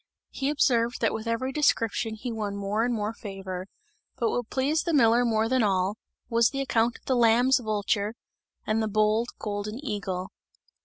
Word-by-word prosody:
He 270 - -2
observed 240 -5 +2
that 225 - +2
with 220 +1 -5
every 230 +3 -1
description 230 -6 +1
he 240 +3 -5
won 210 -3 -3
more 200 +2 -1
and 245 - +1
more 215 -1 -2
favour; 195 -4 -7 0.5
but 230 -2 +1
what 245 -2 -2
pleased 285 +4 0
the 335 -3 +1
miller 235 -2 +5
more 225 -2 +1
than 255 +1 +2
all, 195 0 +1 0.3
was 230 -1 +3
the 275 - -4
account 235 -3 +1
of - - -29
the 260 - +1
lamb's 245 +3 +4
vulture 210 -1 -1 0.5
and 215 +1 +1
the 220 - 0
bold 215 +2 +2
golden 210 +1 -4
eagle. 190 -5 -3
225 Hz, 175 wpm, -27 LUFS, 210-245 Hz, 0.5 s, miller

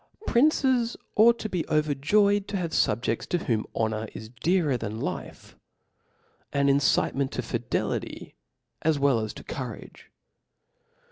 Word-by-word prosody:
Princes 255 -3 +2 0.2
ought 235 +2 +6
to' 215 - -4
be 180 -5 -1
overjbyed 160 +8 +2
to 200 - -2
have 170 -3 -2
fubje<a^§ 115 -6 0
to 175 - 0
whom 115 -10 -1
honor 110 0 -1
i$ 110 -1 -8
dearer 170 -6 +2
than 110 -2 -4
life; - - -6 1.0
ah 140 - +3
incitement 140 0 +2
to - - -2
fidelity - - -3 0.5
as 160 -1 +2
well 140 -4 +3
as 110 -1 -3
to - - -11
courage.' - - -8
150 Hz, 130 wpm, -26 LUFS, 120-205 Hz, 1.0 s, ought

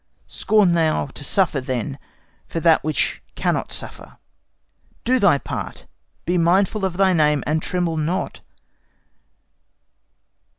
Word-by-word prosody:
Scorn 210 -5 +2
thou 160 -3 +1
to 145 +1 -9
suffer, 155 -2 +1
then, 130 +2 -4 0.5
For 165 - -3
that 165 -1 +4
which 155 0 -1
cannot - - -1
suffer. - - -6 0.9
Do 255 +2 +2
thy 200 -9 +5
part! - - -6 0.4
Be 175 +1 +1
mindful 195 +4 +2
of 180 -2 -3
thy 190 -1 +4
name, 150 -3 +2
and 155 +1 0
tremble 175 -2 -1
not. 165 +5 -2
170 Hz, 120 wpm, -21 LUFS, 150-190 Hz, 0.9 s, thy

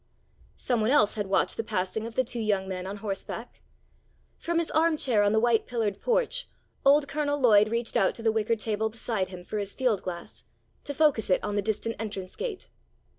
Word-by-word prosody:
Some 245 -3 0
one 215 - +2
else 255 -7 +4
had 205 -2 -3
watched 195 - +1
the 225 - -1
passing 215 +1 -2
of 230 - -10
the 260 - +3
two 240 -1 -5
young 205 -3 0
men 185 -1 -4
on 200 +2 -5
horseback. 210 +3 -5 0.8
From 340 0 -1
his 335 -1 0
arm 320 0 +3
chair 240 -8 +2
on 205 0 +3
the 220 - +3
white 235 -1 +2
pillared 220 -5 -2
porch, - - 0 0.3
old 280 +1 +5
Colonel 290 0 -1
Lloyd 215 -5 +5
reached 230 +1 -2
out 205 -5 +3
to 230 - -7
the 225 - +3
wicker 220 +1 +1
table 220 0 -1
beside 220 -3 -2
him 180 -1 -9
for 210 +4 -4
his 200 -1 -4
field 245 -7 +1
glass, 175 -2 -7 0.4
to 285 - -5
focus 285 -9 +2
it 185 - +2
on 205 -1 -2
the 205 - +2
distant 220 +2 -2
entrance 200 -4 -5
gate. 460 -6 -5
220 Hz, 210 wpm, -27 LUFS, 205-260 Hz, 0.8 s, old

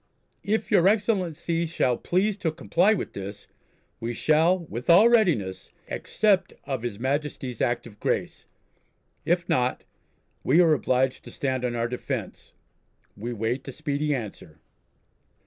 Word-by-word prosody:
If 220 +2 -1
your 190 -3 +5
Excellency 180 -6 0
shall 130 -6 +1
please 190 - 0
to 170 -5 -1
comply 175 +5 +2
with 185 - -5
this, 100 +1 -8 0.5
we 115 +1 -4
shall, 160 +7 +3
with 125 -2 -6
all 185 +7 +8
readiness, 150 - +1 0.2
accept 195 -3 +1
of 135 -4 -3
His 120 -4 -4
Majesty's 135 -2 -2
Act 120 -1 0
of 105 -3 -13
Grace. - - -2 0.8
If 175 0 +1
not, 125 0 0 0.6
we 150 +6 +4
are 165 -3 +6
obliged 130 -2 +1
to - - -9
stand 130 -2 -2
on 120 -1 -1
our 115 0 0
defence. 125 +1 -5 0.6
We 120 +4 -5
wait 115 +4 -2
a - - -4
speedy 150 +1 -1
answer." 100 -9 -7
145 Hz, 140 wpm, -26 LUFS, 120-175 Hz, 0.8 s, all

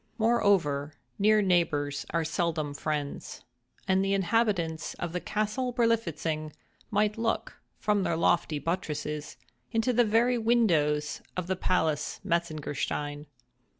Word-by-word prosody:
Moreover, 190 -11 +2 0.2
near 215 +1 +5
neighbors 150 -6 +1
are 165 -1 0
seldom 155 -2 -1
friends; 145 -1 -4 0.4
and 190 0 +3
the 195 0 +1
inhabitants 195 -5 0
of 170 -1 -4
the 180 - -1
Castle 215 +4 -1
Berlifitzing 170 - 0 0.4
might 210 0 +1
look, 225 0 -2 0.2
from 210 -1 +1
their 170 -3 0
lofty 165 -2 +2
buttresses, 150 -2 -3 0.3
into 225 +3 +1
the 240 +1 +5
very 235 +3 +3
windows 165 -11 +2 0.2
of 180 - -1
the 190 +1 -1
palace 160 -5 0
Metzengerstein. 150 -3 -2
175 Hz, 115 wpm, -29 LUFS, 155-215 Hz, 0.4 s, near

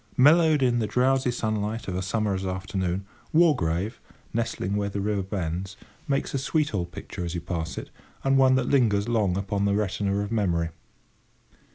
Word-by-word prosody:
Mellowed 155 +1 +6
in 120 -2 +3
the 110 - 0
drowsy 130 +2 +2
sunlight 110 -1 -2
of 95 - -3
a 90 - -1
summer's 95 0 -1
afternoon, 95 0 -2 0.3
Wargrave, 105 - +2 0.3
nestling 115 -4 -1
where 100 -1 0
the 100 - -3
river 100 0 0
bends, 95 0 -4 0.3
makes 140 -1 -1
a 135 - 0
sweet 150 0 0
old 90 -3 -2
picture 90 0 -7
as 85 0 -4
you 85 - -3
pass 85 -2 -4
it, - - -6 0.3
and 135 0 +3
one 130 -1 +5
that 130 -1 +1
lingers 110 -6 +3
long 105 -6 +1
upon 100 0 -1
the 100 0 +2
retina 100 -1 0
of 100 +1 -4
memory. 85 -7 +1
105 Hz, 175 wpm, -26 LUFS, 95-125 Hz, 0.3 s, Mellowed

